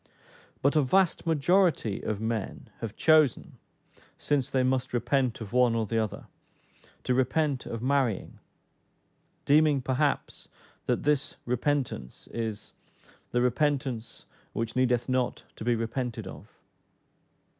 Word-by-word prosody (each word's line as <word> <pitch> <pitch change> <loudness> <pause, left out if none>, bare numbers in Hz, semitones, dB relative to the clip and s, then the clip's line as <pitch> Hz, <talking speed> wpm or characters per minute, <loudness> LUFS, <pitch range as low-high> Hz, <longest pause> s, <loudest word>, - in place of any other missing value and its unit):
But 140 +3 +3
a 155 - +5
vast 175 +5 +2
majority 165 - +2
of 105 -2 -3
men 110 -2 -4
have 110 -2 -5
chosen, 155 -5 +3 0.6
since 145 -4 0
they 130 -1 +1
must 130 0 0
repent 120 0 +1
of 110 0 -7
one 125 -2 +4
or 115 -1 0
the 115 +2 0
other, 110 -3 -3 0.8
to 125 - +1
repent 130 +2 +1
of 115 0 -5
marrying, 130 -6 0 1.1
deeming 150 0 +4
perhaps 135 +3 -1 0.4
that - - 0
this 145 -1 +1
repentance 125 - -2
is 110 -3 -4 0.6
"the 120 0 +1
repentance 130 -3 -1 0.3
which 115 0 -3
needeth 125 -2 +2
not 130 -1 -1
to - - -8
be 120 +1 +2
repented 115 +1 -3
of." - - -10
125 Hz, 125 wpm, -28 LUFS, 115-145 Hz, 1.1 s, a